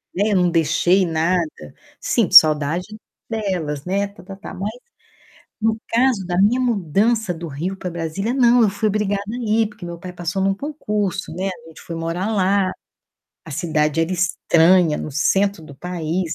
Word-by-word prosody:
né, 205 +3 +1
eu - - +2
não 180 -2 +3
deixei 170 +3 +2
nada. 165 +1 0 0.5
Sinto - - +1
saudade 155 +3 +6 0.4
delas, 180 -10 -3
né, 195 +2 0
tá-tá-tá. 195 0 -11
Mas, 200 +3 -4 0.9
no 220 0 +1
caso 235 -4 +2
da 175 0 -2
minha 240 +6 +3
mudança 215 -1 +1
do 170 0 -7
Rio 170 +7 -4
pra 185 - -5
Brasília, 170 +7 -3
não, 245 -2 +4
eu 210 - +4
fui 205 +2 -1
obrigada 205 -1 0
a 240 - -4
ir, 220 0 +3
porque 210 -4 -11
meu 170 -1 -7
pai 180 +1 -8
passou 175 +2 -3
num 195 0 +1
concurso, 210 - -3
né, 190 +2 -2
a 165 -3 -10
gente 160 - -14
foi 165 - -7
morar 170 +6 -2
lá. 195 -1 +2 0.7
A 160 - -11
cidade 155 0 0
era 165 +2 0
estranha, 175 -2 +3
no 155 - -5
centro 195 +4 +1
do 145 -2 -12
país, 170 +1 -3
185 Hz, 170 wpm, -20 LUFS, 165-205 Hz, 0.9 s, saudade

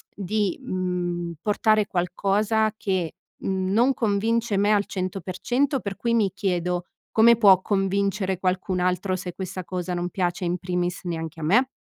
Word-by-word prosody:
di, 205 0 -1
mhmm, 180 -6 -2
portare 215 +1 +2
qualcosa 200 +4 +1
che 185 -6 -1 0.3
non 195 +7 +2
convince 225 0 0
me 205 +2 +3
al 205 -1 +2
100% 195 - -1
per 200 -1 -5
cui 235 -1 0
mi 210 -5 +2
chiedo: 180 -3 -1 0.3
"Come 235 +1 +6
può 195 -5 +7
convincere 195 -1 0
qualcun 185 0 -1
altro, 185 +1 0
se 180 -2 -6
questa 185 -1 -5
cosa 180 -1 -3
non 175 0 -2
piace 180 0 -1
in 175 +1 0
primis 180 0 -2
neanche 165 -2 -5
a - - -4
me?". 235 - +4
190 Hz, 145 wpm, -24 LUFS, 180-210 Hz, 0.3 s, può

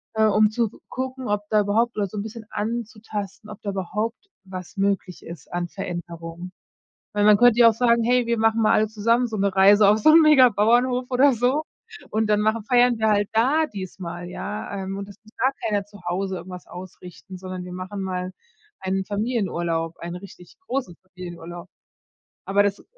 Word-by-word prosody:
äh, 220 0 +3
um 215 0 +4
zu 230 0 0 0.2
gucken, 260 0 -5
ob 205 0 0
da 215 -1 +4
überhaupt 225 +4 +1
oder 205 -2 0
so 210 - -9
'n 200 - -2
bisschen 225 0 -9
anzutasten, 215 -2 -5
ob 210 - -10
da 205 - -4
überhaupt 210 - -4 0.2
was 185 +1 -8
möglich 195 -2 -1
ist 165 -4 -11
an 175 0 -2
Veränderungen. 175 -1 -7 0.6
Weil 205 0 +2
man 210 0 +7
könnte 245 0 +5
ja 235 - +9
auch - - -4
sagen: 235 0 +3
„Hey, 245 0 +2
wir 235 0 0
machen 225 +1 +2
mal 215 - +4
alle 215 0 +3
zusammen 230 +3 +1
so 220 - -4
'ne 200 -1 0
Reise 200 +2 +6
auf 210 +1 +5
so 220 - +5
'n 325 +2 +8
mega 290 -5 +7
Bauernhof 245 +4 +2
oder 265 +2 +5
so 250 +6 +1 0.5
und 220 0 0
dann 210 0 +3
machen 220 0 0
feiern 245 0 +3
wir 220 0 +2
halt 205 -1 +2
da 275 +8 +3
diesmal, 175 - -7
ja, 205 +2 -5
ähm, 190 +1 -5
und 200 0 -6
es 200 - -12
muss 215 - -21
gar 260 +3 +2
keiner 205 -2 0
zu 205 -1 -15
Hause 190 +2 -2
irgendwas 180 0 -9
ausrichten, 180 0 -11
sondern 185 0 -7
wir 180 - -8
machen 185 +2 -6
mal 185 -1 -3 0.5
einen 190 0 -1
Familienurlaub, 175 -7 -2
einen 170 +1 -6
richtig 180 -1 -13
großen 250 - -3
Familienurlaub“. 175 -1 -9 0.8
Aber 200 +1 +3
das 200 0 -2
205 Hz, 190 wpm, -23 LUFS, 185-230 Hz, 0.8 s, ja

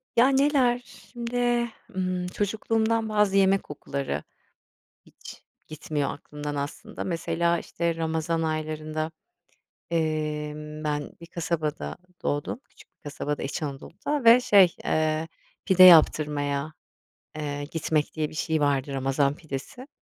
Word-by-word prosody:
Ya, 245 +2 +6
neler, 270 -3 +3
şimdi, 240 0 -2 0.3
ımm, 185 -1 -1
çocukluğumdan 220 +3 0
bazı 210 -2 +2
yemek 195 0 +4
kokuları 140 -1 -4 0.8
hiç - - -13 0.2
gitmiyor 150 -2 -3
aklımdan 150 0 -6
aslında. 145 +10 -5
Mesela, 170 -1 0
işte, 170 0 -2
ramazan 160 0 -1
aylarında, 155 0 -2 0.8
emm, 150 -1 -2
ben 150 -1 -2
bir - - -8
kasabada 160 - -3 0.3
doğdum, 145 - -2
küçük - - -19
bir - - -69
kasabada, 145 -1 -4
İç 145 +4 -3
Anadolu'da 190 - -4
ve, 230 +2 +8
şey, 195 -7 +5
eee, 155 0 +1 0.4
pide 185 -1 +6
yaptırmaya, 150 -3 +5 0.6
eee, 145 -1 -3
gitmek 155 0 -1
diye 155 -1 -1
bir - - -12
şey 160 0 0
vardı 140 -1 +1
ramazan 135 +1 +1
pidesi. 155 - -7
160 Hz, 115 wpm, -26 LUFS, 150-195 Hz, 0.8 s, ve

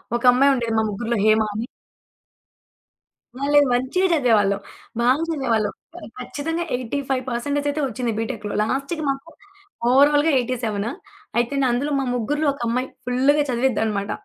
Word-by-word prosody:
ఒక 240 - -2
అమ్మాయి 275 +3 +4
ఉండేది, 235 -3 -2
మా - - +2
ముగ్గుర్లో 230 +3 -2
హేమా 220 0 +4
అని. 220 +3 -3 1.7
మళ్ళీ 290 +1 +4
మంచిగా 260 +10 +1
చదివేవాళ్ళం. 215 -9 +3 0.4
బాగా 255 +5 +3
చదివేవాళ్ళం. 240 -9 0 0.2
ఖ - - -9 0.2
ఖచ్చితంగా 325 +6 -3
85% 260 +2 -2
అయితే 295 +1 -2
వచ్చింది 245 -1 -2
బీటెక్‌లో. 225 -3 -4
లాస్ట్‌కి 275 +8 -2
మాకు 275 +3 -3 0.6
ఓవరాల్‌గా 290 +4 +5
87. 230 -3 -2 0.5
అయితే, 240 +3 +1
న - - +2
అందులో 265 +5 -1
మా - - 0
ముగ్గురిలో 295 +6 -1
ఒకమ్మాయి 250 0 -2 0.2
ఫుల్లుగా 265 +4 +3
చదివిద్దనమాట. 220 -5 0
250 Hz, 125 wpm, -22 LUFS, 230-285 Hz, 1.7 s, ఓవరాల్‌గా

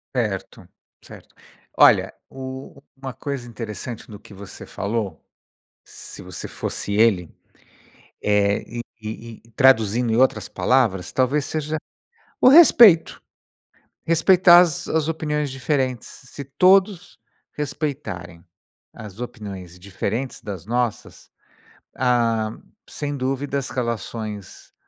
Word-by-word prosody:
Certo, 105 -6 -3 0.4
Certo. - - -15 0.4
Olha, - - +5 0.2
u 130 +1 -9 0.2
uma 135 -1 -7
coisa 135 -3 -5
interessante 115 0 -7
do 105 - -10
que - - -18
você 100 0 -11
falou, 105 -1 -4 0.6
se - - -11
você - - -8
fosse 100 - -5
ele, 100 -5 +2 0.9
eh, 100 -1 +2
e 120 +1 -5 0.2
e 110 +1 -8
e 115 - -23
traduzindo 115 -2 +3
em - - +2
outras 130 +3 +2
palavras, 110 -9 +1
talvez 135 +3 +1
seja 155 0 -3 0.6
o 255 - +8
respeito. 235 - +7 0.8
Respeitar 175 +1 +6
as 170 -5 0
as 160 -1 0
opiniões 150 -2 -2
diferentes. 130 -2 -2
Se 140 +2 -11
todos 185 +6 +2 0.3
respeitarem 130 - -5 0.5
as 105 +1 -11
opiniões 100 -8 -8
diferentes 110 +7 -4
das 95 -3 -7
nossas, 120 -1 -3 0.7
ah, 115 -3 +1 0.4
sem 145 -1 -4
dúvida 135 +1 -2
as 135 - -4
relações 110 -4 -5
125 Hz, 110 wpm, -22 LUFS, 105-145 Hz, 0.9 s, o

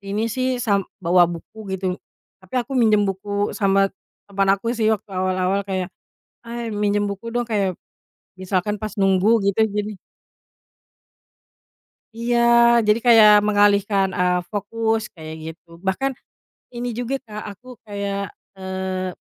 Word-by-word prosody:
ini 200 +2 -2
sih 255 0 0
sam 210 -5 +1 0.2
bawa 175 0 +5
buku 190 +4 -7
gitu, 185 -1 -3 0.4
tapi 185 +5 -14
aku 250 +2 -2
minjem 220 -5 +3
buku 200 +1 -2
sama 195 -1 +2 0.3
teman 195 -1 -1
aku 230 +4 -3
sih 225 -3 +1
waktu 215 -2 -1
awal-awal 185 +1 0
kayak, 185 -2 -3 0.5
“Hai, 235 -1 -5
minjem 205 0 +1
buku 200 +3 -5
dong,” 240 +1 -1
kayak 200 -5 -1 0.6
misalkan 190 +2 -1
pas 215 0 -5
nunggu 195 -1 +2 0.2
gitu 200 - -5
gini. 210 -1 -4 2.2
Iya 235 +1 0 0.5
jadi 210 +1 +4
kayak 225 -3 +8 0.2
mengalihkan, 205 -1 +3
eee, 180 0 +2
fokus 220 +2 -1
kayak 160 -2 -8
gitu. 160 +2 -10 0.2
Bahkan 270 +9 0 0.6
ini 245 +1 -3
juga, 245 +2 -3
Kak, 210 0 -7
aku 245 +6 -17 0.2
kayak, 200 -1 -4 0.3
eee, 190 -1 -3
205 Hz, 130 wpm, -21 LUFS, 190-220 Hz, 2.2 s, kayak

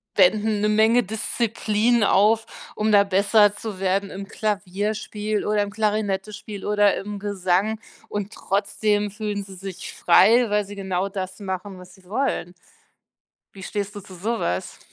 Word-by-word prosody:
wenden 210 +2 +3
'ne 210 - +2
Menge 220 +3 +4
Disziplin 220 +1 0
auf, 215 +3 +4 0.3
um 215 +1 +1
da 200 0 +7
besser 200 +2 +4
zu 210 -4 -6
werden 195 +1 0
im 195 +1 -7
Klavierspiel 210 +1 -2
oder 210 0 +2
im 205 - -5
Klarinettespiel 210 -1 -2
oder 205 -1 +3
im 205 +1 -6
Gesang 200 +1 0 0.3
und 205 0 -4
trotzdem 205 +1 0
fühlen 210 -1 -3
sie 195 -1 -11
sich 190 0 -7
frei, 225 +7 +5
weil 210 0 +2
sie 205 - -9
genau 190 0 -2
das 190 0 -5
machen, 190 0 -5
was 180 0 -13
sie 190 -1 -22
wollen. 215 -5 -2 1.0
Wie 190 - -10
stehst 205 +1 -4
du 205 - -6
zu 190 - -13
so 220 +6 -2
was? 90 +1 -3
205 Hz, 155 wpm, -23 LUFS, 195-215 Hz, 1.0 s, da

